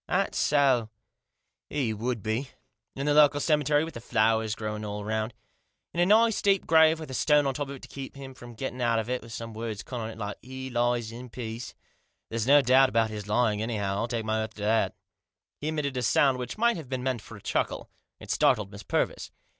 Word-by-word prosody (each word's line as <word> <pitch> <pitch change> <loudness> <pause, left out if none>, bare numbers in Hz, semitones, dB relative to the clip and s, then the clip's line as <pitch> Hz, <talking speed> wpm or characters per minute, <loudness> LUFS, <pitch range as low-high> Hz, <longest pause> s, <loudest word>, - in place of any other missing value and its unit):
" - - -65
That - - 0
so? 135 -6 +3 0.8
He 130 -7 -1
would 115 0 -3
be. 115 +5 -2 0.5
In 135 - -3
the 145 - +3
local 145 -1 +6
cemetery, 150 -1 +2
with 165 - -6
the 115 - -8
flowers 110 -1 +1
growing 105 -1 -4
all 105 0 -4
around. 110 +1 -2 0.6
In 170 - -3
a 175 - +4
nice 225 +2 +4
deep 195 -1 +2
grave 160 0 +5
with 155 -4 -7
a - - -5
stone 150 +3 +3
on 135 - 0
top 145 +1 -3
to 140 0 -7
keep 135 0 -8
him 135 -1 -9
from 120 -2 -12
getting 130 +1 -5
out 115 -1 +2
of 110 +2 -2
it, 125 - -1
and 115 - -12
some 115 -1 -6
words 110 -2 -5
cut 125 - -6
on 110 -1 -4
it, 115 - -9
like 105 -2 -5
' - - -45
He 130 +1 -7
lies 120 -1 0
in 125 +2 -9
peace.' 115 0 -6 0.6
There's 115 0 -1
no 145 +1 +7
doubt 130 +1 +5
about 115 -2 +1
his 105 -1 -6
lying, 105 -1 +1
anyhow, 105 -4 -1
I'll 115 - -1
take 115 -2 -3
my 110 0 0
oath 110 0 -5
to 105 - -7
that" 110 +2 +2 0.6
He 150 - -4
emitted 150 -3 -2
a 125 - -1
sound 130 +3 +3
which 125 - -5
might 235 0 +3
have 155 -6 -8
been 130 -1 -3
meant 130 -4 -1
for 105 - -11
a - - -15
chuckle. - - -2 0.3
It - - -7
startled 100 -2 +2
Miss 100 0 -9
Purvis. - - -1
120 Hz, 230 wpm, -27 LUFS, 110-140 Hz, 0.8 s, no